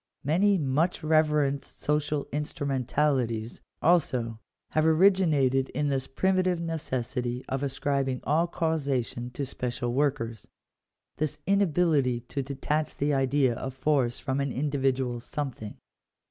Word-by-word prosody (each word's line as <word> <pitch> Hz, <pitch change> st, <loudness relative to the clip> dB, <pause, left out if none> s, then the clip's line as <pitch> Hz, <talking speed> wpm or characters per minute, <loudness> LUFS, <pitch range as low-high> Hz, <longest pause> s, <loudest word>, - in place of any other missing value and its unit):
Many 190 Hz, +8 st, +3 dB
muoh 155 Hz, +3 st, +1 dB
reverenoed 150 Hz, -3 st, +2 dB
social 150 Hz, -1 st, -2 dB
instrumentalities, 135 Hz, -5 st, -1 dB, 0.2 s
also, 125 Hz, -9 st, +2 dB, 0.3 s
have 155 Hz, -, +2 dB
ori 160 Hz, +5 st, +6 dB
ginated 140 Hz, -8 st, +1 dB
in 145 Hz, -1 st, +1 dB
this 135 Hz, -1 st, -1 dB
primitive 185 Hz, +2 st, +1 dB
necessity 130 Hz, -6 st, -3 dB
of 135 Hz, 0 st, -2 dB
ascribing 135 Hz, -1 st, -1 dB
all 160 Hz, +5 st, +2 dB
causation 140 Hz, -8 st, -1 dB
to 140 Hz, +3 st, -4 dB
special 120 Hz, -2 st, -3 dB
workers 120 Hz, -6 st, -1 dB, 0.3 s
— -, -, -57 dB
this 155 Hz, -2 st, -1 dB
inability 160 Hz, -10 st, +2 dB
to 140 Hz, +4 st, -4 dB
detach 150 Hz, +3 st, -2 dB
the 145 Hz, +1 st, +1 dB
idea 135 Hz, -1 st, +2 dB
of 130 Hz, +3 st, -5 dB
force 135 Hz, -4 st, +1 dB
from 130 Hz, +1 st, -2 dB
an 140 Hz, -1 st, -1 dB
individual 135 Hz, -3 st, 0 dB
something. 120 Hz, -4 st, -5 dB
140 Hz, 120 wpm, -28 LUFS, 130-155 Hz, 0.3 s, ori